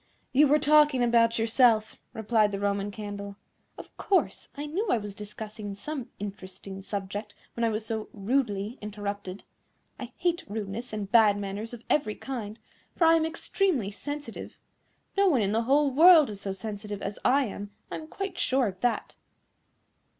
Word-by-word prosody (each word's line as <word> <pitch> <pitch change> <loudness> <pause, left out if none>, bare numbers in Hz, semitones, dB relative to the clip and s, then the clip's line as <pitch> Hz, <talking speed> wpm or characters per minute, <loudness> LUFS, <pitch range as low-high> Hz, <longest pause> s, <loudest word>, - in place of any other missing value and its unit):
"You 290 +3 +6
were 295 +2 +5
talking 300 -3 +5
about 230 -1 +4
yourself," 225 -1 +3 0.2
replied 220 -1 +2
the 200 - -3
Roman 200 0 0
Candle. 200 -1 -7 0.4
"Of - - -11
course; 390 -3 0
I 290 - -4
knew 365 +10 -2
I - - +3
was 205 -2 -6
discussing 210 0 -7
some 275 +3 -6
interesting 195 -1 -7
subject 205 +1 -5 0.2
when 235 - -3
I 230 - +3
was 215 0 -3
so 220 -1 -4
rudely 215 0 -1
interrupted. 205 -2 -5 0.6
I 250 -2 -7
hate 345 -1 0
rudeness 215 +3 -5
and 205 -2 -5
bad 215 -3 +6
manners 205 +2 -5
of 240 -1 -9
every 245 -8 +1
kind, 225 -5 -6 0.4
for 335 - +3
I 325 - +7
am 320 -1 +2
extremely 325 - 0
sensitive. 290 +7 -7 0.6
No 395 0 +4
one 280 -10 +3
in 200 -1 +1
the 225 +2 +2
whole 280 +2 +3
world 315 -2 +7
is 200 -1 -8
so 195 - -3
sensitive 205 +1 -6
as 200 +1 -4
I 275 +2 +4
am, 205 -1 -6 0.2
I - - -3
am 310 - -9
quite 390 +4 -5
sure 260 -1 +2
of 190 -3 -4
that." 245 -1 -1
220 Hz, 170 wpm, -28 LUFS, 205-275 Hz, 0.6 s, I